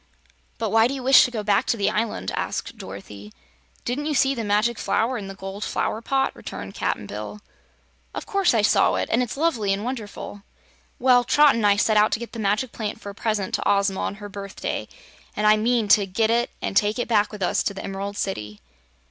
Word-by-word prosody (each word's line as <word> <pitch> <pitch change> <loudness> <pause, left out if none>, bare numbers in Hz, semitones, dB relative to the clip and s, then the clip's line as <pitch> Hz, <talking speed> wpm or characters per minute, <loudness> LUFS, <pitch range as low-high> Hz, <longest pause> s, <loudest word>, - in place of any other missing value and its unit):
"But 220 -3 -2
why 225 +1 +5
do 275 - -3
you 265 - -6
wish 265 +1 +7
to - - -2
go 225 -4 -4
back 205 -1 +2
to 235 - +1
the 200 -1 +1
island?" 210 - -2
asked - - -3
Dorothy. 100 +2 -9 0.5
"Didn't 280 +5 -2
you 300 - 0
see 270 0 +3
the 235 -4 -4
Magic 210 +2 +1
Flower 235 +4 0
in 205 -4 -5
the 195 - -8
gold 195 +1 -6
flower 220 - -2
pot?" 270 +2 0
returned - - -8
Cap'n 105 - -2
Bill. 105 - -7 0.8
"Of - - -5
course 395 -10 +2
I 215 - +3
saw - - +4
it, - - -2
and 235 - +3
it's 245 +1 -3
lovely 260 -11 +1
and 195 +1 -1
wonderful." 215 -4 -6 0.6
"Well, 250 -1 +4
Trot 295 +3 +5
an' 225 -2 0
I 200 -1 +5
set 215 +1 +2
out 210 +1 +4
to - - 0
get 235 - -7
the 230 - -6
magic 215 +4 0
plant 215 -1 -5
for 205 - -7
a - - -12
present 210 -2 -2
to - - 0
Ozma 200 -1 +2
on - - -2
her 205 0 -8
birthday, 200 -1 -5 0.5
and 210 - -1
I 210 0 +7
mean 225 0 +1
to 200 -1 +5
get 220 +4 +1
it 235 +1 +2
an' - - -2
take 205 +3 +2
it 245 - -2
back 210 -3 +2
with 210 -3 -5
us 180 - +1
to 200 - -2
the - - -6
Emerald 200 +1 -5
City." 105 - -4
215 Hz, 225 wpm, -24 LUFS, 200-235 Hz, 0.8 s, wish